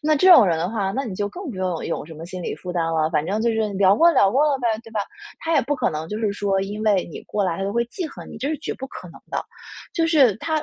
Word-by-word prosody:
那 310 +1 +3
这 370 +6 +7
种 250 - +8
人 170 - +2
的 175 - -1
话， 200 -4 -1
那 270 - -1
你 220 - -5
就 205 +2 -2
更 350 - -7
不 210 - -8
用 185 -3 -2
有 165 - -3
什 160 - -10
么 160 +2 -9
心 185 +1 -7
理 - - -3
负 180 -1 -7
担 170 -2 0
了， 160 -1 +1
反 155 -2 0
正 205 +4 -1
就 235 - +2
是 220 -2 0
聊 195 +1 +4
过 335 +1 +6
聊 195 - +4
过 275 +6 +3
了 280 - +2
呗， 245 - -1 0.2
对 225 - -12
吧？ 215 - -1 0.4
他 330 - -2
也 - - +5
不 290 +4 -1
可 - - 0
能 155 +1 -5
就 210 - -4
是 215 -2 0
说 200 -1 0
因 205 +2 -4
为 200 -4 +3
你 165 - -8
过 210 - -2
来 180 +1 -1
他 200 - -2
会 235 +1 +1
记 345 +8 -5
恨 - - -11
你， - - -9
这 275 - -2
是 315 - -1
绝 - - -4
不 265 - -7
可 180 -9 -10
能 165 - -14
的。 - - -1 0.5
就 330 -4 +2
是 275 - +4
他 315 +4 -1
205 Hz, 340 characters per minute, -22 LUFS, 185-270 Hz, 0.5 s, 种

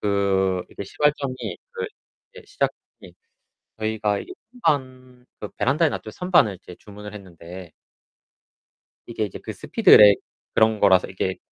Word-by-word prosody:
그 95 -2 +1
이제 - - -7
시발점이 145 +1 0 0.4
그 470 -1 -4 0.5
이제 460 - -13
시작이 415 0 -1 1.1
저희가 110 -2 -1
이게 - - -9 0.3
선반 130 -4 -2
그 105 - -5
베란다에 150 +6 +2
놨죠. 110 - -6
선반을 170 - +2
이제 90 - -12
주문을 105 0 -11
했는데 90 -3 -11 1.3
이게 115 -2 -3
이제 100 - -7
그 - - -7
speedrack 105 -1 +6 0.3
그런 110 -1 +3
거라서 95 -2 +4
이게 95 0 -2
네. 95 - -4
105 Hz, 310 characters per minute, -23 LUFS, 95-130 Hz, 1.3 s, speedrack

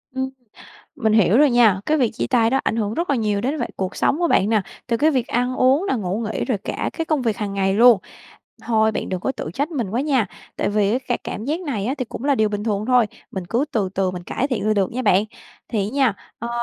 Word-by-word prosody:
Ừm, 265 0 -1 0.7
mình 220 -2 +1
hiểu 215 0 +4
rồi 295 -1 +5
nha, 225 -6 +4
cái 310 - +2
việc 245 -4 +2
chia - - -3
tay 230 -3 +2
đó 270 +1 +2
ảnh - - 0
hưởng 215 -1 -1
rất 340 +2 -1
là 280 - +2
nhiều 210 -3 0
đến 270 +8 -1
vại 240 - -3
cuộc 190 0 -3
sống 290 - +1
của 345 -2 +1
bạn 200 - +3
nè, 215 -3 +2 0.2
từ 235 - +1
cái 310 +7 +3
việc 255 -5 0
ăn 250 +1 -1
uống 270 +9 +3
nè, - - +1
ngủ 200 -2 -2
nghỉ - - -2
rồi 245 -6 -1
cả 195 - -3
cái 325 - -3
công 305 -5 0
việc 225 -3 0
hàng 200 -2 -4
ngày 195 0 +1
luôn. 235 -1 +7 0.6
Thôi, 220 -1 +2
bạn - - -3
đừng 185 -1 -3
có 265 - -1
tự 155 - -6
trách 285 +4 -1
mình 245 - -3
quá 235 +5 0
nha! 270 -6 +1 0.3
Tại - - 0
vì, 210 +3 +1
ca 250 -2 -2
cảm 215 - -5
giác 310 +7 -1
này 235 - -3
á 265 - 0
thì 255 - -1
cũng 240 - -8
là 285 - +3
điều 215 -4 +2
bình 205 0 -4
thường 215 -1 -1
thôi, 250 -3 +4 0.2
mình 190 -2 -5
cứ 235 +9 0
từ 205 -4 0
từ 190 -1 +1
mình 180 -1 -7
cải 270 +10 -2
thiện 215 -5 -2
là 215 - +3
được 195 -2 +1
nha 255 - -2
bạn. 200 -3 +4 0.4
Thì 205 -3 -1
á - - -13
nha, 265 -7 +3 0.2
ờ, 235 - -5
230 Hz, 275 wpm, -21 LUFS, 205-265 Hz, 0.7 s, luôn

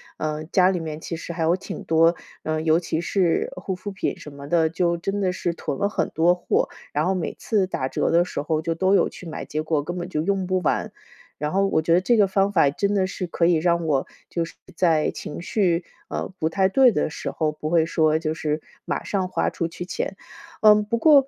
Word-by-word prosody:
呃， 155 0 -3
家 180 +3 +4
里 185 -2 0
面 155 -1 -5
其 165 - -5
实 170 - -6
还 165 -1 -2
有 170 +3 +3
挺 - - -7
多， 165 +1 +4 0.3
嗯， 155 0 -1
尤 160 +1 +4
其 165 -2 -2
是 175 -1 +1
护 185 +1 -3
肤 185 +3 -6
品 195 - -3
什 - - -10
么 140 0 -10
的， 160 0 +3
就 170 +1 +1
真 195 +4 -3
的 185 -2 +1
是 175 -2 -2
囤 140 - -4
了 200 - +1
很 - - -1
多 170 +2 +4
货， 180 - 0 0.2
然 150 +2 +1
后 190 - +2
每 180 - -3
次 205 -4 +1
打 130 -7 -2
折 - - 0
的 170 +1 +4
时 175 - -4
候 155 +1 -1
就 165 +1 -1
都 190 +3 +3
有 - - +3
去 180 - -11
买， 160 - -5
结 155 - -3
果 155 -2 0
根 175 +4 -5
本 175 0 -4
就 155 -4 -2
用 195 0 0
不 185 0 +1
完。 - - 0 0.5
然 150 +1 -2
后 195 +1 +3
我 160 -5 +1
觉 165 +1 +2
得 180 - +5
这 235 +5 +3
个 205 - +6
方 195 +1 +1
法 165 -7 +4
真 200 +7 0
的 190 -2 +2
是 185 -1 -4
可 170 0 0
以 175 - +5
让 170 +1 +1
我 140 -4 +1 0.2
就 170 - -2
是 165 - -8 0.2
在 165 -4 +2
情 - - -7
绪， 175 -1 0 0.2
呃， - - -3
不 160 - +1
太 190 +3 +2
对 255 +6 +5
的 155 -5 -1
时 - - -4
候， 155 -2 -1
不 150 0 -5
会 165 -1 +3
说 155 -1 +2
就 160 -1 -2
是 155 -1 -2 0.3
马 - - -2
上 190 -2 -1
花 185 - -1
出 170 - -2
去 170 +1 -7
钱。 185 - -3 0.5
嗯， 210 -1 +7
不 230 +3 -1
过 280 0 +6
170 Hz, 260 characters per minute, -24 LUFS, 160-190 Hz, 0.5 s, 嗯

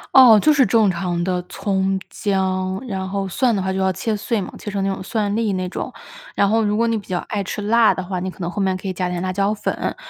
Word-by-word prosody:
哦， 250 -5 +9
就 305 - +4
是 280 -3 +4
正 215 -1 +3
常 175 -1 -2
的 180 0 -1
葱、 195 -1 -1
姜， 190 -1 -1
然 190 -5 -4
后 195 +1 -2
蒜 240 +4 +1
的 195 - 0
话 190 - -1
就 190 - -2
要 190 0 +1
切 225 - -2
碎 215 +1 -1
嘛， 185 - -7
切 - - -6
成 200 -1 -2
那 195 0 0
种 - - -7
蒜 205 +1 -1
粒 220 -3 0
那 185 -1 -2
种。 - - -5 0.4
然 200 - +3
后 225 +1 +3
如 210 0 +1
果 230 +2 +2
你 230 -1 +1
比 205 - -9
较 180 -2 -1
爱 205 - -1
吃 200 +2 -4
辣 225 +2 +4
的 185 - -4
话， 180 0 -3
你 185 +1 -3
可 185 - -12
能 170 0 -2
后 200 - -3
面 190 -1 +1
可 190 +1 -5
以 185 - -2
加 180 0 -2
点 180 -1 -3
辣 185 0 -1
椒 200 +2 +1
粉， 210 - -3
195 Hz, 295 characters per minute, -21 LUFS, 185-215 Hz, 0.4 s, 哦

